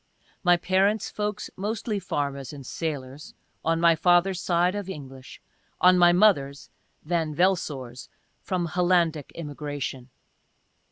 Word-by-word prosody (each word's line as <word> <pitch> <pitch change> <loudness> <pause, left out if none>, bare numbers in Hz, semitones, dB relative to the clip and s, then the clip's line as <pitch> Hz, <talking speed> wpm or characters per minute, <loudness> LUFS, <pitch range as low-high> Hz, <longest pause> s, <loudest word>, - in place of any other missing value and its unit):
My 175 -1 +5
parents' 195 +4 +1
folks 210 0 -4
mostly 215 +2 -3
farmers 140 -7 -3
and 140 -2 -10
sailors 145 -2 -6
— - - -44
on 165 0 +1
my 170 -1 +5
father's 175 +2 +3
side, 175 +1 +2
of 205 -2 -5
English 135 -6 -9 0.2
— - - -41
on 185 - +7
my 175 -1 +6
mother's, 160 -8 +2 0.3
(Van 160 -2 -1
Velsor's,) 145 -9 -1 0.3
from 180 -2 -2
Hollandic 170 -4 +1
immigration. 145 -4 -6
170 Hz, 125 wpm, -26 LUFS, 145-185 Hz, 0.3 s, on